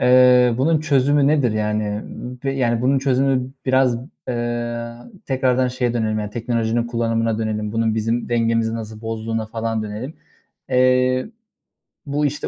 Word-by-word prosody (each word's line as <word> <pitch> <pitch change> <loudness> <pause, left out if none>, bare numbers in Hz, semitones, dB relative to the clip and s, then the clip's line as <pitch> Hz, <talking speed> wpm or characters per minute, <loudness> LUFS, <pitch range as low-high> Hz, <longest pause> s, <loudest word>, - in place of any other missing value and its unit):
eee, 125 -1 +6
bunun 155 +3 +2
çözümü 145 -1 +3
nedir? 140 -6 +3
Yani, 105 0 0
ııı, 110 +4 -6
bi 135 0 -1
yani 120 -3 +1
bunun 135 +2 +3
çözümü 130 -1 +1 0.2
biraz, 130 -2 +3 0.3
eee, 120 -1 -2 0.4
tekrardan 130 -1 +1
şeye 125 -1 -1
dönelim, 110 -2 0
yani 105 -1 -4
teknolojinin 115 0 -1
kullanımına 115 -1 0
dönelim. 105 -1 -2
Bunun 115 -1 +1
bizim 115 +2 -1
dengemizi 115 -1 +1
nasıl 110 -1 -7
bozduğuna 115 0 -3
falan 115 0 -2
dönelim. 110 +8 -6 0.6
Eee, 130 0 +3 0.8
bu 145 +1 0
işte 145 +1 -2
120 Hz, 140 wpm, -21 LUFS, 115-130 Hz, 0.8 s, eee